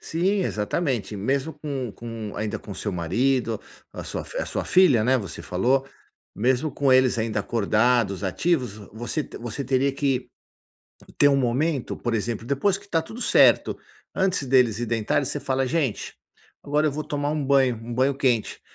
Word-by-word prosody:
Sim, 190 Hz, +5 st, 0 dB
exatamente, 115 Hz, -, -2 dB
mesmo 135 Hz, +9 st, -1 dB
com 140 Hz, -5 st, -4 dB
com 115 Hz, -2 st, -7 dB
ainda 105 Hz, 0 st, -2 dB
com -, -, -12 dB
o -, -, -5 dB
seu 105 Hz, -, -3 dB
marido, 115 Hz, +7 st, 0 dB, 0.3 s
a -, -, -7 dB
sua -, -, -4 dB, 0.2 s
a -, -, -2 dB
sua -, -, -3 dB
filha, 180 Hz, -12 st, +5 dB
né, 130 Hz, +4 st, +3 dB
você 100 Hz, -5 st, -7 dB
falou, 130 Hz, +9 st, +1 dB, 0.5 s
mesmo 130 Hz, +6 st, +1 dB
com 140 Hz, 0 st, +1 dB
eles 130 Hz, -1 st, +4 dB
ainda 110 Hz, -1 st, -1 dB
acordados, 110 Hz, -2 st, +1 dB
ativos, 125 Hz, -, 0 dB, 0.2 s
você 120 Hz, +7 st, -3 dB
te -, -, -10 dB
você 120 Hz, +3 st, -5 dB
teria 135 Hz, +1 st, +1 dB
que 135 Hz, -2 st, -1 dB, 0.9 s
ter 145 Hz, -, +6 dB
um 140 Hz, -, +3 dB
momento, 135 Hz, +2 st, 0 dB
por 120 Hz, -, -2 dB
exemplo 115 Hz, +1 st, -2 dB
depois 160 Hz, +9 st, +1 dB
que 205 Hz, 0 st, -18 dB
tá 165 Hz, -4 st, +1 dB
tudo 220 Hz, +9 st, -10 dB
certo, -, -, +4 dB, 0.4 s
antes 185 Hz, -7 st, 0 dB
deles 125 Hz, -4 st, +3 dB
ir 120 Hz, -, -2 dB
deitarem 115 Hz, +5 st, 0 dB
você 145 Hz, -, -3 dB
fala 135 Hz, -2 st, -1 dB
"Gente, 140 Hz, -5 st, -1 dB, 0.5 s
agora 150 Hz, +2 st, +1 dB
eu 150 Hz, -, +1 dB
vou 155 Hz, +2 st, -4 dB
tomar 145 Hz, 0 st, -2 dB
um 150 Hz, -1 st, -1 dB
banho, 135 Hz, -3 st, +3 dB
um 115 Hz, +2 st, -8 dB
banho 130 Hz, +3 st, +2 dB
quente". 125 Hz, -6 st, 0 dB
130 Hz, 175 wpm, -24 LUFS, 115-145 Hz, 0.9 s, ter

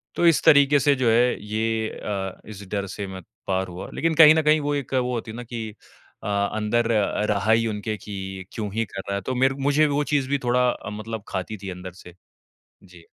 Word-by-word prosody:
तो 175 Hz, -, +1 dB
इस 165 Hz, -, +4 dB
तरीके 145 Hz, 0 st, +6 dB
से, 140 Hz, +1 st, +3 dB
जो 130 Hz, -3 st, +1 dB
है, 120 Hz, +2 st, +3 dB
ये 110 Hz, +1 st, -1 dB
अ, 95 Hz, -2 st, -5 dB
इस 105 Hz, -2 st, -9 dB
डर 100 Hz, -1 st, -1 dB
से 100 Hz, +1 st, -6 dB
मैं 95 Hz, 0 st, -8 dB, 0.3 s
पार 95 Hz, 0 st, 0 dB
हुआ। 90 Hz, 0 st, -8 dB
लेकिन 165 Hz, 0 st, 0 dB
कहीं 155 Hz, 0 st, +9 dB
न 160 Hz, -, +3 dB
कहीं, 155 Hz, +1 st, +4 dB
वो 145 Hz, 0 st, -1 dB
एक 140 Hz, -2 st, -4 dB
वो 125 Hz, -1 st, 0 dB
होती 115 Hz, -2 st, -4 dB
है 110 Hz, -, -8 dB
ना 120 Hz, -, -6 dB
कि 115 Hz, -2 st, -6 dB, 0.5 s
अ, -, -, -5 dB, 0.3 s
अंदर 110 Hz, +2 st, 0 dB, 0.4 s
रहा 105 Hz, +1 st, +1 dB
ही 115 Hz, +1 st, +4 dB
उनके 105 Hz, 0 st, -3 dB
कि, 95 Hz, -2 st, -7 dB
"क्यों 105 Hz, -3 st, -4 dB
ही 115 Hz, +1 st, 0 dB
कर 95 Hz, -1 st, -7 dB
रहा 100 Hz, -, -1 dB
है?" 100 Hz, -, -2 dB
तो 130 Hz, -, -3 dB
मेर 130 Hz, +2 st, +3 dB, 0.2 s
मुझे 150 Hz, +2 st, +4 dB
वो 145 Hz, 0 st, 0 dB
चीज़ 135 Hz, -2 st, +1 dB
भी 140 Hz, -, +2 dB
थोड़ा 125 Hz, +1 st, +3 dB
अ, 115 Hz, -, -5 dB
मतलब 110 Hz, 0 st, -6 dB
खाती 95 Hz, +3 st, -4 dB
थी 100 Hz, -, -5 dB
अंदर 90 Hz, 0 st, -8 dB
से। 90 Hz, -, -12 dB, 0.7 s
जी। 90 Hz, -3 st, -16 dB
110 Hz, 230 wpm, -24 LUFS, 100-130 Hz, 0.7 s, कहीं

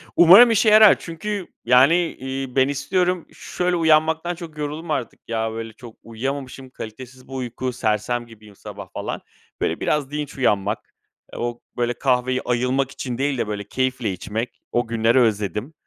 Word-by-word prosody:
Umarım 195 Hz, +8 st, +9 dB
işe 220 Hz, 0 st, +4 dB
yarar 215 Hz, -1 st, +7 dB
çünkü, 195 Hz, +3 st, -5 dB, 0.2 s
yani, 125 Hz, +7 st, +6 dB, 0.2 s
iii, 130 Hz, -1 st, -5 dB
ben 130 Hz, -1 st, +4 dB
istiyorum, 175 Hz, +5 st, 0 dB
şöyle 180 Hz, 0 st, -2 dB
uyanmaktan 160 Hz, +1 st, +2 dB
çok 165 Hz, -3 st, -10 dB
yoruldum 150 Hz, +2 st, -4 dB
artık, 130 Hz, -5 st, -3 dB
ya, 110 Hz, -1 st, -1 dB
böyle, 115 Hz, 0 st, -6 dB
çok 115 Hz, 0 st, -13 dB
uyuyamamışım, 130 Hz, +3 st, -5 dB
kalitesiz 130 Hz, +2 st, -10 dB
bir 135 Hz, -, -11 dB
uyku, 125 Hz, 0 st, -4 dB
sersem 115 Hz, +1 st, -1 dB
gibiyim 105 Hz, -3 st, -16 dB
sabah, 100 Hz, -2 st, -10 dB
falan. -, -, -4 dB, 0.4 s
Böyle -, -, -1 dB
biraz 145 Hz, -2 st, -1 dB
dinç 150 Hz, -2 st, -5 dB
uyanmak, 105 Hz, -4 st, 0 dB, 0.4 s
eee, -, -, -7 dB
o, 120 Hz, 0 st, -3 dB, 0.2 s
böyle, 120 Hz, 0 st, 0 dB
kahveyi 130 Hz, 0 st, 0 dB
ayılmak 125 Hz, +2 st, 0 dB
için 125 Hz, -3 st, -5 dB
değil 140 Hz, 0 st, 0 dB
de, 110 Hz, -, -1 dB
böyle, 105 Hz, -1 st, -4 dB
keyifle 125 Hz, 0 st, -1 dB
içmek, 110 Hz, +6 st, -5 dB
o 120 Hz, -1 st, 0 dB
günleri 115 Hz, +2 st, +2 dB
özledim. 105 Hz, -, 0 dB
130 Hz, 160 wpm, -22 LUFS, 115-150 Hz, 0.4 s, Umarım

